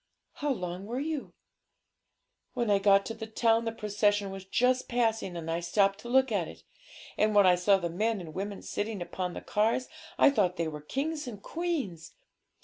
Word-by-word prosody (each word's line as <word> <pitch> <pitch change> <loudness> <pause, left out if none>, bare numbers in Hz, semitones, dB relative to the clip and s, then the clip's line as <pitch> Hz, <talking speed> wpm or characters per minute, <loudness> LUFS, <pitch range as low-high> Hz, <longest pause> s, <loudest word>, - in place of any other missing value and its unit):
'How 295 -1 -2
long 180 -4 -4
were 240 +3 -3
you?' 300 -1 -4 1.2
'When 235 -4 +1
I 200 - +4
got 195 0 +4
to 225 - -4
the 220 0 -7
town 225 +1 +2
the 225 - -1
procession 205 -2 0
was 195 0 -8
just 250 +6 +2
passing, 225 -6 0
and 165 -1 -4
I 165 - 0
stopped 195 +3 +2
to 240 - -9
look 265 0 +4
at 195 -6 0
it. 80 0 -12 0.6
And 215 0 +3
when 205 -1 +7
I 180 - +7
saw 180 +3 +4
the 175 -2 -2
men 210 +6 0
and 165 -3 -8
women 200 +2 -5
sitting 205 -3 -3
upon 180 0 -4
the - - -5
cars, 225 +4 0 0.3
I - - +6
thought 190 -9 +1
they 165 -1 0
were 150 -1 -6
kings 290 - -3
and 215 -5 -7
queens. 275 - -4
205 Hz, 195 wpm, -29 LUFS, 185-235 Hz, 1.2 s, when